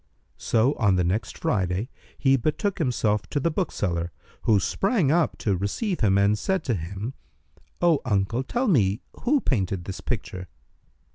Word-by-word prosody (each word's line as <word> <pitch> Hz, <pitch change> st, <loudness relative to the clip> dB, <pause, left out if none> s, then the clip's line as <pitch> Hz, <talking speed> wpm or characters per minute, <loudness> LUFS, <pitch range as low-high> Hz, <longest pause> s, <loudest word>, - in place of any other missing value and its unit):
So 120 Hz, +5 st, +2 dB
on 100 Hz, -4 st, +4 dB
the 90 Hz, -, +2 dB
next 95 Hz, +6 st, -1 dB
Friday 95 Hz, +2 st, 0 dB, 0.3 s
he 135 Hz, -1 st, +4 dB
betook 155 Hz, -, -1 dB
himself 115 Hz, -, 0 dB
to 145 Hz, -, 0 dB
the 165 Hz, +4 st, +1 dB
bookseller, 90 Hz, -, -1 dB, 0.3 s
who 105 Hz, -3 st, +5 dB
sprang 190 Hz, -, +1 dB
up 170 Hz, 0 st, +2 dB
to 100 Hz, -3 st, 0 dB
receive 135 Hz, -, -2 dB
him, 100 Hz, -3 st, +3 dB
and 100 Hz, +1 st, +4 dB
said 190 Hz, -, -1 dB
to 120 Hz, -, 0 dB
him, 100 Hz, +7 st, -4 dB, 0.7 s
"Oh 165 Hz, -4 st, +4 dB
uncle, 105 Hz, +1 st, 0 dB
tell 240 Hz, -, -1 dB
me 110 Hz, -, +3 dB, 0.2 s
who 285 Hz, +4 st, +4 dB
painted 95 Hz, -7 st, -1 dB
this 95 Hz, -, -6 dB
picture." 90 Hz, 0 st, -4 dB
110 Hz, 155 wpm, -25 LUFS, 95-155 Hz, 0.7 s, who